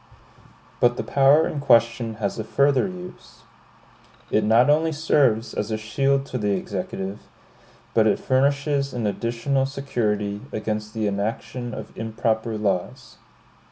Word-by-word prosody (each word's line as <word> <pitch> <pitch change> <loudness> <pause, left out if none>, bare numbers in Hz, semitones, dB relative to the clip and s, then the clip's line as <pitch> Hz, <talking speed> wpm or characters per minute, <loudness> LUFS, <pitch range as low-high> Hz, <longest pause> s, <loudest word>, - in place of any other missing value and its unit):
But 120 0 +3
the - - -2
power 140 +3 +4
in 150 - -4
question 115 -3 +2
has 105 -1 -3
a - - -2
further 140 - +2
use. 180 -1 -11 0.9
It 105 - +2
not 115 +4 +4
only 160 +2 +3
serves 140 -7 +2
as 105 - -3
a 110 - -1
shield 135 +6 0
to 130 - -4
the 105 -2 0
Executive, 95 +1 -5 0.7
but - - +4
it - - +3
furnishes 140 +1 +1
an 120 -3 -2
additional 120 +6 -1
security 105 -7 -2
against 105 0 -4
the 110 -1 -1
enaction 110 +4 -3
of 110 - -9
improper 110 0 -1
laws. 105 +5 -3
115 Hz, 135 wpm, -23 LUFS, 105-140 Hz, 0.9 s, power